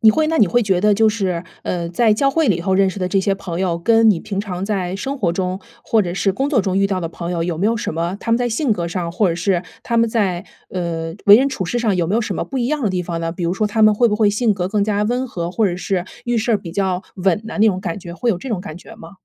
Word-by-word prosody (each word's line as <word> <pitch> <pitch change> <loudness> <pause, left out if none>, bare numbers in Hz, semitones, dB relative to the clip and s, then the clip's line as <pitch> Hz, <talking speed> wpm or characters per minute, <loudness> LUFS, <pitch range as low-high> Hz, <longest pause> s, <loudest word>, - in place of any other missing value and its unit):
你 220 -2 +7
会 310 +7 +1
那 320 +1 0
你 210 - +6
会 240 +6 +2
觉 190 -3 +1
得 210 +1 +4
就 220 +1 +4
是， 185 -5 -2 0.2
呃， 170 -2 -3
在 220 +4 +3
教 275 +5 +2
会 315 0 +1
里 180 -4 +2
头 190 +3 -1
认 195 0 +4
识 190 - -5
的 185 - -1
这 195 +1 +1
些 195 +1 +1
朋 180 -2 -5
友， 175 -3 0
跟 225 +5 +4
你 185 - +1
平 195 +3 -4
常 190 -3 -4
在 190 -3 -2
生 275 +6 -4
活 185 -8 +1
中， 185 +2 -2 0.2
或 225 - +3
者 175 -3 -2
是 195 0 +1
工 270 +8 -1
作 245 -9 +2
中 190 -1 -1
遇 195 - +3
到 190 -2 -2
的 165 - -3
朋 170 +1 -6
友， 170 -1 -1
有 170 -2 -3
没 200 - +1
有 230 +1 +1
什 210 - -3
么 170 +4 -2
他 230 - -2
们 230 - +3
在 245 -1 0
性 235 +1 +1
格 170 -4 -2
上， 170 -1 -3
或 195 +2 +2
者 165 - 0
是 175 +1 0 0.2
他 235 -1 0
们 230 0 +3
在， 195 -6 0 0.3
呃， 165 -2 -3
为 205 +1 +10
人 270 +3 +3
处 195 -9 -3
事 240 - -1
上， 225 -4 +1
有 175 -2 0
没 190 - -1
有 230 - +2
什 - - -3
么 - - -2
不 270 - -6
一 240 -2 0
样 300 +2 -1
的 220 - +2
地 185 -1 -1
方 170 -1 -4
呢？ 165 0 -2
比 175 +1 -5
如 170 - 0
说， 210 +3 0
他 220 +2 0
们 215 0 +6
会 235 +2 +3
不 210 - 0
会 210 -2 +3
性 215 +1 +1
格 180 -2 -2
更 205 +2 0
加 205 0 0
温 245 +4 -1
和， 170 -5 -4
或 215 +3 +1
者 175 -2 -2
是 185 -1 -2 0.2
遇 240 -1 0
事 230 +2 0
儿 - - +4
比 170 -4 -9
较 190 -1 -1
稳 190 +1 +1
呐， 220 - -6
那 220 - +6
种 190 -4 +2
感 180 +1 -4
觉。 175 -2 -9
会 240 +6 -2
有 185 - -1
这 255 - -8
种 215 -6 -1
感 155 - -8
觉 225 - -13
吗？ 220 - -12
195 Hz, 345 characters per minute, -19 LUFS, 180-225 Hz, 0.3 s, 为